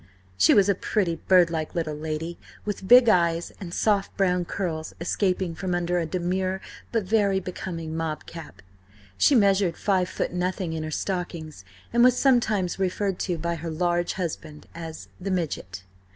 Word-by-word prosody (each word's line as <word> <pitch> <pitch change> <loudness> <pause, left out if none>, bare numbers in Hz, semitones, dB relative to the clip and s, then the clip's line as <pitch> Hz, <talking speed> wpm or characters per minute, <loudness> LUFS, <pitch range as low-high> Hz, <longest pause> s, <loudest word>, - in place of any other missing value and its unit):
She 95 +2 +5
was 200 -1 +5
a 200 - +4
pretty, 185 -3 -1
birdlike 170 -3 +3
little 160 -3 -1
lady, 160 +2 -4 0.3
with 200 -2 -4
big 245 +1 +8
eyes, 170 -4 +2
and 180 -3 -7
soft 200 +1 0
brown 180 -2 +2
curls 165 -4 -4
escaping 180 0 0
from 180 +2 -2
under 175 0 0
a 165 - -2
demure 185 +2 -1 0.3
but 225 -3 +1
very 200 -1 +2
becoming 170 -3 -5
mob 160 -1 -3
cap. 165 -9 -10 0.5
She 280 - +4
measured 195 -5 +3
five 185 -3 +1
foot - - -3
nothing 180 -1 -2
in 160 - -3
her 155 - -4
stockings, 165 - -4 0.3
and 240 0 +5
was 250 0 +5
sometimes 220 -9 +2
referred 190 0 -1
to 180 -3 -1
by 170 +2 -2
her 165 0 -5
large 175 +1 0
husband 155 -4 -5
as 165 -1 -8
the 190 +2 -4
Midget. 140 - -3
180 Hz, 165 wpm, -25 LUFS, 165-195 Hz, 0.5 s, big